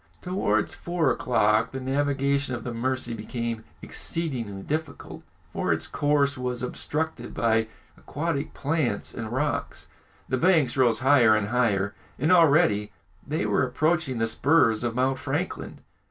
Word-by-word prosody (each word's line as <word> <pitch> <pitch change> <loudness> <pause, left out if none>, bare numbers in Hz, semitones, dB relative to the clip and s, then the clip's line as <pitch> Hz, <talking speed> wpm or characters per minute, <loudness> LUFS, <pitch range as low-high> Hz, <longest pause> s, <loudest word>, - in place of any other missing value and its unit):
Towards 110 - 0
four 170 -6 0
o'clock, 110 -2 +2
the 135 - -3
navigation 140 0 0
of 120 - -7
the 120 - -4
Mercy 130 0 -2
became 115 +1 -4 0.2
exceedingly 120 -12 -4
difficult, 155 -1 -5 0.3
for - - -1
its - - +1
course 145 -1 +1
was 125 -1 -2
obstructed 150 0 -3
by 115 -1 +2 0.3
aquatic 150 -1 -4
plants 140 -8 -1
and 115 -2 -6
rocks. 145 +4 -2 0.4
The 130 - 0
banks 160 -5 +3
rose 125 -3 +3
higher 130 -5 +5
and 105 -1 -1
higher, 105 -5 +1 0.2
and 155 +6 +1
already 145 - +4 0.4
they - - -1
were - - +2
approaching 150 +1 0
the 115 - +1
spurs 115 -1 +2
of 120 -1 -2
Mount 130 +1 +1
Franklin. 145 +6 -4
130 Hz, 140 wpm, -26 LUFS, 115-145 Hz, 0.4 s, higher